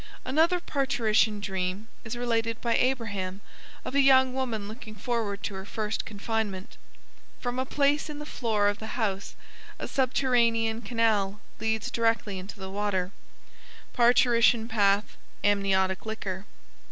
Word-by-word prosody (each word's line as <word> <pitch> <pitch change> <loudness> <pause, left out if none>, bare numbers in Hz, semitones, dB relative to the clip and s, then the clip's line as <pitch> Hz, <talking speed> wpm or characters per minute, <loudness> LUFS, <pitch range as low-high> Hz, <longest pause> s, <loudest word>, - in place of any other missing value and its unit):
Another 325 +7 +3
parturition 225 -8 +1
dream 190 +1 -3 0.2
is 225 - -5
related 230 -2 0
by 235 -1 +1
Abraham 205 -7 0 0.5
of - - -4
a 280 - +5
young 260 -1 +5
woman 235 -6 -2
looking 215 0 -9
forward 210 -2 -2
to - - -3
her 190 0 -6
first 210 +1 -3
confinement. 205 -2 -3 0.6
From 245 0 -3
a 260 - -1
place 290 +2 +1
in 300 - -6
the 295 - -7
floor 220 -7 0
of 205 0 0
the 220 - -6
house 200 -4 -2 0.4
a - - -5
subterranean 235 -4 +2
canal 210 -3 +1 0.2
leads 220 0 -1
directly 225 -4 0
into 195 +2 -9
the 190 0 -6
water 195 -2 -1 0.8
(parturition 240 -1 +4
path, 205 -2 +2 0.3
amniotic 190 -2 +2
liquor). 205 -3 -5
220 Hz, 135 wpm, -28 LUFS, 200-245 Hz, 0.8 s, a